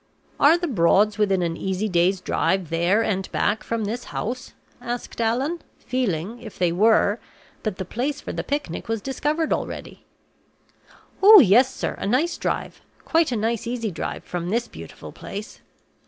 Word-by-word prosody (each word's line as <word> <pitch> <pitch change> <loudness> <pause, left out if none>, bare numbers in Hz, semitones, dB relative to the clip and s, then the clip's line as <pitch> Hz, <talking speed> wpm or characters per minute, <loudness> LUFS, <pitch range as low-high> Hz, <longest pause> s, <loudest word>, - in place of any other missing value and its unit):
"Are 305 +4 +6
the 350 0 -2
Broads 205 - +3
within 195 -3 +2
an 165 -1 -1
easy 190 +4 -2
day's 180 0 +2
drive 190 -4 0
there 175 +7 +2
and 195 -3 -2
back 210 +2 0
from 230 -2 -2
this 235 +4 -4
house?" 250 +3 -5 0.3
asked 240 0 -5
Allan, 260 +9 0 0.2
feeling, 225 -3 -2
if 220 -4 -10
they 175 -2 +2
were, 210 +3 +3 0.4
that 215 -4 -3
the 190 - -4
place 260 +10 -2
for - - -6
the - - -3
picnic 285 - -3
was 225 0 -1
discovered 295 +6 -1
already. - - -5 1.2
"Oh, 415 +2 +10
yes, 250 - +5
sir; - - -3
a - - -3
nice 270 +11 +1
drive - - -3 0.2
quite 325 -3 +2
a - - 0
nice 225 +1 -1
easy 235 -3 -2
drive 165 - -5
from 175 -1 -4
this 235 +4 0
beautiful - - -10
place!" 210 +4 -8
220 Hz, 165 wpm, -23 LUFS, 190-255 Hz, 1.2 s, Oh